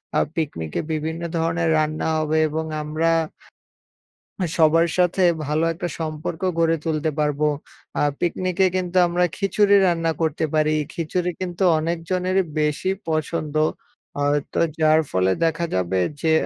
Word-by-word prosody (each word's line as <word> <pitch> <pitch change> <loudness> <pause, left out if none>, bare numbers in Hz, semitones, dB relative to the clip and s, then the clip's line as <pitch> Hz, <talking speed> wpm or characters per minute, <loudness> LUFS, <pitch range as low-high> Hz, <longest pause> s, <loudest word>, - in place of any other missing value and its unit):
আর - - +3
পিকনিকে 80 - -3
বিভিন্ন 160 +2 -3 0.2
ধরনের 165 0 0
রান্না 155 +1 0
হবে 155 0 0
এবং 160 +1 -2 0.2
আমরা 155 +2 0 1.5
সবার 165 +1 +5
সাথে 180 +1 +2 0.2
ভালো 150 +2 0
একটা 175 +1 -4
সম্পর্ক 155 0 -4 0.2
গড়ে 165 0 +3
তুলতে 155 0 0
পারবো। 150 0 +1 0.5
আ - - +1 0.2
পিকনিকে 185 +2 +1
কিন্তু 185 0 -1
আমরা 175 +1 +1
খিচুড়ি 200 0 +3
রান্না 165 -2 +1
করতে 160 0 0
পারি। 155 0 +3 0.2
খিচুড়ি 175 +2 -1
কিন্তু 180 0 -2 0.2
অনেকজনেরই 180 +3 0 0.2
বেশি 150 +4 0 0.2
পছন্দ 155 -1 -2 0.6
আ - - -1 0.3
তো - - 0 0.2
যার 155 0 +5
ফলে 95 0 +2
দেখা 165 +1 0
যাবে 95 0 0 0.2
যে 160 - +2
160 Hz, 130 wpm, -22 LUFS, 155-175 Hz, 1.5 s, সবার